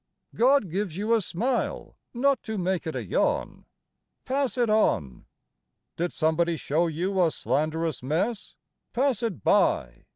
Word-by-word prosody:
God 250 - +3
gives 190 -2 -2
you 215 +3 +1
a 225 - +3
smile, 240 +8 -2 0.2
not 265 +1 +1
to 220 -1 -5
make 185 -2 -1
it 160 - -3
a - - -3
yawn; - - -1 0.6
Pass 270 -1 -1
it 240 -1 +2
on! 80 - +1 0.7
Did 175 +1 -2
somebody 165 +1 +1
show 160 +4 0
you 180 +4 -1
a 165 - +4
slanderous 155 +1 -1
mess? 170 - -2 0.4
Pass 255 -2 +1
it 195 - -3
by! - - +1
185 Hz, 140 wpm, -26 LUFS, 160-235 Hz, 0.7 s, a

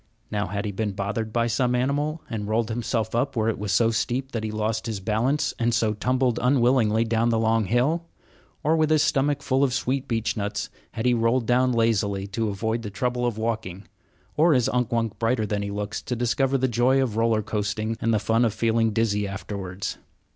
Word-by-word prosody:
Now 105 -1 -1
had 100 +3 -3
he 105 - -2
been 105 +1 -2
bothered 105 +3 -3
by 115 +1 +1
some 125 +2 +1
animal 145 +5 -1
and 105 -3 -4
rolled 110 +1 0
himself 110 -1 -2
up 125 +4 0
where 110 -1 +1
it 110 - -2
was 105 -1 -2
so 115 +4 +3
steep 130 +3 -1
that 115 -2 -3
he 110 - -2
lost 110 +1 -2
his 110 -3 -3
balance, 115 +9 0
and 120 0 +2
so 110 -2 +1
tumbled 125 +2 0
unwillingly 120 -4 +3
down 115 0 +1
the 115 - +2
long 110 -1 +2
hill; 140 - +1 0.6
or, 155 +2 +3
with 155 -1 +2
his 155 -1 +4
stomach 140 -1 +1
full 135 +1 +2
of 130 -3 +1
sweet 130 +1 -1
beechnuts, 110 -3 -2 0.2
had 110 - -3
he 125 - +4
rolled 115 +1 +2
down 125 +2 +3
lazily 105 -4 +1
to 105 +3 -2
avoid 110 +3 -2
the 105 - -5
trouble 125 +4 -1
of 115 -3 -3
walking; 110 -4 -3 0.5
or 160 0 +4
is 125 -2 +2
Unk 125 -1 0
Wunk 115 -2 -1
brighter 115 -1 +1
than 105 0 -2
he 100 - -3
looks 105 +1 -4
to 125 - -3
discover 130 +3 +1
the 130 0 +1
joy 125 +3 +3
of 125 -5 0
roller 115 -1 +2
coasting 110 +1 -2
and 115 - +1
the 110 - +3
fun 115 +2 +2
of 110 -3 +1
feeling 115 0 +2
dizzy 105 -2 +1
afterwards? 95 -1 -5
115 Hz, 210 wpm, -25 LUFS, 105-125 Hz, 0.6 s, his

